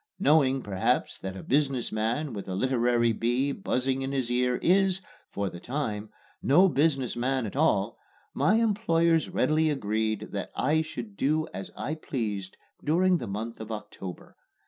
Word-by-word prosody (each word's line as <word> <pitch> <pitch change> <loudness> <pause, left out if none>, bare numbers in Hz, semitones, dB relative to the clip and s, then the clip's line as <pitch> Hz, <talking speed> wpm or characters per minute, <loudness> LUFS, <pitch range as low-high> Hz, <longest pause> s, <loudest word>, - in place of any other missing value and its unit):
Knowing, 135 -3 +3
perhaps, 95 -2 0
that 95 0 -5
a - - -8
business 135 -3 +1
man 115 +6 -1
with 100 -2 -6
a 95 - -3
literary 120 0 +2
bee 120 +5 +1
buzzing 135 -5 -1
in 135 0 -2
his 130 -3 -1
ear 125 0 +2
is, 190 +1 +3 0.3
for 100 0 -2
the 85 -2 -7
time, 110 -5 -3 0.3
no 180 +8 +5
business 140 -5 +1
man 130 +1 0
at 105 - -6
all, 115 -8 +2 0.3
my 210 - +3
employers 170 -8 +2
readily 155 +1 +2
agreed 110 -5 -1
that 100 - -4
I 155 +4 +2
should 120 -10 -7
do 155 +6 +1
as 95 +1 -6
I 150 - -2
pleased 105 -11 -4 0.3
during 180 +3 +3
the 120 - -5
month 110 +4 -5
of 110 0 -7
October. 105 -4 -8
130 Hz, 160 wpm, -28 LUFS, 110-155 Hz, 0.3 s, no